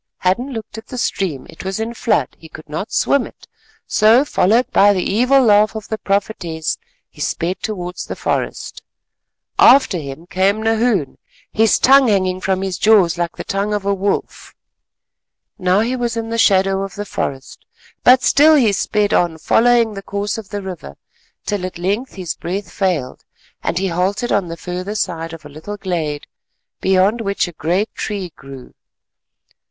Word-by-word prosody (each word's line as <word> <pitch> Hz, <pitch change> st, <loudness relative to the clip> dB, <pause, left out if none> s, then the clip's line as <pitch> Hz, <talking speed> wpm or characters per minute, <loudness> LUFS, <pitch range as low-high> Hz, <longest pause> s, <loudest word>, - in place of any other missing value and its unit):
Hadden 235 Hz, +9 st, 0 dB
looked 220 Hz, -2 st, -7 dB
at 220 Hz, -, -15 dB
the 255 Hz, -, -7 dB
stream; 170 Hz, -, -2 dB
it -, -, -11 dB
was 190 Hz, +2 st, -3 dB
in 225 Hz, +1 st, -3 dB
flood. 230 Hz, -1 st, 0 dB
He 160 Hz, -, -13 dB
could 155 Hz, -, -12 dB
not 155 Hz, +8 st, -5 dB
swim 280 Hz, -2 st, +2 dB
it, -, -, -18 dB, 0.4 s
so 225 Hz, +6 st, +4 dB
followed 230 Hz, -1 st, +2 dB
by 205 Hz, +1 st, +5 dB
the 185 Hz, -2 st, -1 dB
evil 255 Hz, +6 st, +3 dB
laugh 215 Hz, -1 st, +4 dB
of 220 Hz, -, -7 dB
the 220 Hz, -, -3 dB
prophetess, 185 Hz, -5 st, -2 dB, 0.3 s
he -, -, -14 dB
sped 175 Hz, +3 st, -2 dB
towards 180 Hz, -4 st, -5 dB
the -, -, -5 dB
forest. -, -, -3 dB, 0.8 s
After 260 Hz, -9 st, +6 dB
him 140 Hz, +2 st, -8 dB
came 190 Hz, +5 st, 0 dB
Nahoon, 225 Hz, -, 0 dB, 0.3 s
his 220 Hz, 0 st, +3 dB
tongue 270 Hz, 0 st, +5 dB
hanging 185 Hz, -3 st, +1 dB
from 190 Hz, 0 st, 0 dB
his 190 Hz, -2 st, -3 dB
jaws 195 Hz, -6 st, +4 dB
like 170 Hz, 0 st, -2 dB
the -, -, -5 dB
tongue 200 Hz, +2 st, -1 dB
of 205 Hz, -1 st, -4 dB
a 200 Hz, -, +2 dB
wolf. 200 Hz, +1 st, -3 dB, 1.0 s
Now 185 Hz, +2 st, +2 dB
he 240 Hz, +3 st, -1 dB
was 240 Hz, -2 st, -2 dB
in 225 Hz, 0 st, -3 dB
the 230 Hz, -, -1 dB
shadow 195 Hz, -2 st, +3 dB
of 195 Hz, 0 st, -6 dB
the 205 Hz, 0 st, -5 dB
forest, 135 Hz, -8 st, -5 dB, 0.4 s
but 255 Hz, +1 st, +6 dB
still 310 Hz, +2 st, +5 dB
he 240 Hz, -8 st, +4 dB
sped 205 Hz, +1 st, 0 dB
on 170 Hz, -2 st, +1 dB
following 230 Hz, +6 st, +3 dB
the 195 Hz, -, -7 dB
course 200 Hz, +2 st, -3 dB
of 210 Hz, -, -11 dB
the 205 Hz, -1 st, -5 dB
river, 175 Hz, -, -8 dB, 0.5 s
till 205 Hz, -3 st, -2 dB
at 185 Hz, -1 st, -5 dB
length 200 Hz, +9 st, -2 dB
his 185 Hz, -4 st, -4 dB
breath 180 Hz, +1 st, -5 dB
failed, 170 Hz, -10 st, -2 dB, 0.4 s
and 170 Hz, -, -2 dB
he 190 Hz, +1 st, 0 dB
halted 190 Hz, +7 st, -1 dB
on 200 Hz, -3 st, +1 dB
the 165 Hz, 0 st, -6 dB
further 180 Hz, +4 st, -5 dB
side 165 Hz, -5 st, -3 dB
of 165 Hz, -2 st, -11 dB
a -, -, -9 dB
little 160 Hz, +8 st, -8 dB
glade, 165 Hz, -7 st, -3 dB, 0.5 s
beyond 190 Hz, +5 st, +2 dB
which 200 Hz, -3 st, -1 dB
a -, -, -7 dB
great 175 Hz, +7 st, -1 dB
tree 195 Hz, -5 st, -5 dB
grew. 135 Hz, -2 st, -12 dB
195 Hz, 175 wpm, -18 LUFS, 180-220 Hz, 1.0 s, After